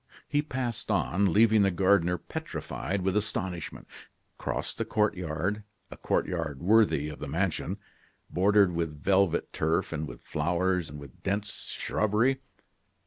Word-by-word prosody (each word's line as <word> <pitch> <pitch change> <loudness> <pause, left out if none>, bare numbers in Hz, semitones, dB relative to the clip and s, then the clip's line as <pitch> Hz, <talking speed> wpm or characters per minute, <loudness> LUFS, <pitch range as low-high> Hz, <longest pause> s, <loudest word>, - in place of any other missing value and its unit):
He 145 0 +2
passed 125 -7 -4
on, 100 -2 +2
leaving 110 +2 +5
the 100 - +4
gardener 90 -1 +3
petrified 95 +3 -4
with 95 +1 +1
astonishment, 95 -5 -2 0.5
crossed - - -3
the - - +2
court 105 -1 +1
yard 90 +4 -2 0.3
a - - -7
court - - 0
yard 80 -6 -3
worthy 100 -6 +4
of 75 -1 -7
the 75 - -5
mansion, 85 +4 -1 0.5
bordered 100 0 +4
with 80 -3 -3
velvet 95 -2 +2
turf, 80 +5 0
with 75 -6 -5
flowers, 90 +2 0
and 75 - -8
with 70 -3 -13
dense 105 +1 -2
shrubbery. 110 +6 +1
95 Hz, 140 wpm, -29 LUFS, 80-105 Hz, 0.5 s, leaving